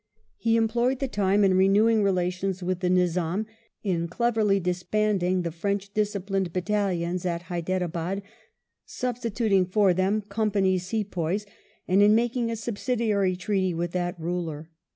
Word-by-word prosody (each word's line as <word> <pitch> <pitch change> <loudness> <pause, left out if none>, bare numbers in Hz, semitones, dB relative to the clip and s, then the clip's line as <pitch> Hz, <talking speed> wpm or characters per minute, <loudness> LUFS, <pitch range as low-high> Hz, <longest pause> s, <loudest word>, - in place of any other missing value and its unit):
He 230 -1 +1
employed 235 +3 +1
the 270 - -2
time 200 -3 +2
in 190 -1 +4
renewing 210 +4 +4
relations 185 -1 0
with 180 0 -1
the 180 -1 0
Nizam, 180 +2 +1 0.4
in 170 -5 0
cleverly 215 0 +1
disbanding 180 0 0
the 170 - -2
French 200 +4 -3
disciplined 195 -3 -1
battalions 180 -2 -1
at 170 -1 -2
Hyderabad, 180 +1 -2 0.6
substituting 230 -5 0
for 195 0 +3
them 195 +4 +1
Company's 200 -3 0
Sepoys, 200 -2 -2 0.4
and 190 +2 +4
in 210 +1 +6
making 235 0 +1
a 230 - -2
subsidiary 220 -4 0
treaty 185 -1 -1
with 170 +1 -2
that 175 -1 -2
ruler. 165 -2 -4
195 Hz, 130 wpm, -26 LUFS, 180-215 Hz, 0.6 s, in